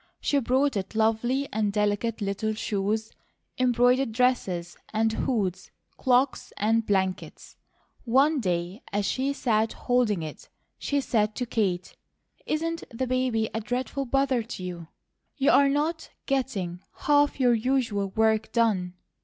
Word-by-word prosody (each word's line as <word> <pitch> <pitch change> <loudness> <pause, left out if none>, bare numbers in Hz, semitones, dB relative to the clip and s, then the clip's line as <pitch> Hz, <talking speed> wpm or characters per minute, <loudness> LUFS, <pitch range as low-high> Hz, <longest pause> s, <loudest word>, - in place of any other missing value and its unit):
She 285 - +1
brought 265 +2 +1
it 195 +2 -4
lovely 225 +5 +1
and 210 -1 +1
delicate 210 +2 0
little 205 +2 -1
shoes, 215 +1 -2 0.5
embroidered 250 0 +3
dresses 195 -8 0 0.2
and 220 0 +1
hoods, 195 -6 -1 0.3
cloaks 255 +1 +1
and 225 +2 +2
blankets. 190 -3 -2 0.5
One 275 +5 +3
day 180 0 -2
as 205 0 0
she 265 +6 0
sat 225 -5 +1
holding 235 -8 +1
it 155 - -9 0.3
she 285 -1 0
said 215 -5 0
to 250 - -2
Kate: 190 -6 -1 0.5
"Isn't 330 +2 -1
the 250 +2 -3
baby 255 -3 0
a 225 - -2
dreadful 255 +4 -3
bother 270 -1 +1
to 220 -4 -7
you? 175 -2 -6 0.5
You're 280 0 +5
not 310 +4 -1 0.2
getting 210 -10 -2 0.2
half 290 -1 +3
your 250 -2 +4
usual 230 -4 0
work 220 +1 +1
done." 195 -6 +1
225 Hz, 130 wpm, -26 LUFS, 205-260 Hz, 0.5 s, You're